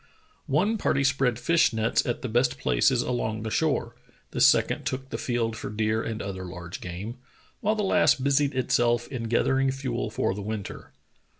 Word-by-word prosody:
One 200 +11 +1
party 140 -6 +1
spread 135 -3 +2
fish 165 +8 +3
nets 110 0 +1
at 120 - -2
the - - -1
best 125 +2 +1
places 65 - +2
along 110 -3 -2
the 110 - -4
shore, 135 -6 0 0.4
the - - -2
second - - +4
took 130 +1 -4
the - - -2
field 115 -2 -1
for - - -6
deer 110 +1 0
and 110 -1 -4
other 95 -1 -5
large 90 -1 -8
game, 95 +8 -6 0.4
while 215 +2 +1
the 210 - -1
last 165 -8 +3
busied 140 0 +2
itself 120 -2 +1
in 125 -4 -4
gathering 135 +4 +2
fuel 130 -3 -3
for 105 - -1
the 100 - -6
winter. 105 -1 -6
120 Hz, 180 wpm, -26 LUFS, 110-135 Hz, 0.4 s, second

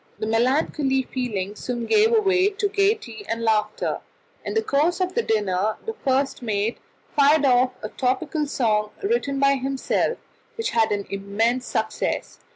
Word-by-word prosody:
The - - -3
melancholy 265 +4 +1
feeling 210 -7 -3
soon 240 +1 -4
gave 435 - +4
way 395 -4 +3
to 410 0 -1
gaiety 395 - 0
and 230 0 -2
laughter; 215 -1 0 0.4
in - - -4
the 445 - +2
course 320 +1 +1
of 370 0 -1
the 470 - +1
dinner 210 - 0
the 450 - -3
first 270 -10 0
mate 215 -1 -1 0.4
fired 290 +1 +5
off 255 0 +4
a 215 - -3
topical 290 +5 -1
song 215 -6 +1
written 400 -10 0
by 275 0 +4
himself, 270 - -1 0.4
which 455 0 -2
had 225 -2 +2
an 200 -1 -1
immense 220 +6 0
success. 220 0 -2
260 Hz, 155 wpm, -23 LUFS, 220-325 Hz, 0.4 s, fired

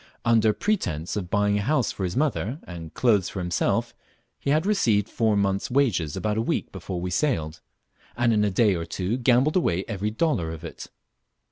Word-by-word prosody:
Under 115 -2 +4
pretence 90 - -2
of 95 -4 -3
buying 105 +1 +2
a - - -1
house 130 +1 +1
for 95 - -5
his 90 +3 -2
mother, 135 -4 0
and 85 -3 -9
clothes, 105 -7 +2
for - - -8
himself, 90 -2 0 0.5
he - - -3
had 155 +4 +2
received 115 - +2
four 110 -2 +1
months' 100 -1 0
wages 115 - +1
about 105 0 -1
a - - +2
week - - -2
before 90 -2 -5
we 90 +1 -3
sailed, 80 - -1 0.6
and 120 -1 +3
in 105 -1 +3
a 105 - +2
day 100 +1 +3
or 85 -2 -2
two 90 +6 -2
gambled 125 +4 +3
away 95 - 0
every 105 -1 -2
dollar 110 - 0
of 80 0 -7
it. 85 - -8
105 Hz, 195 wpm, -25 LUFS, 90-120 Hz, 0.6 s, Under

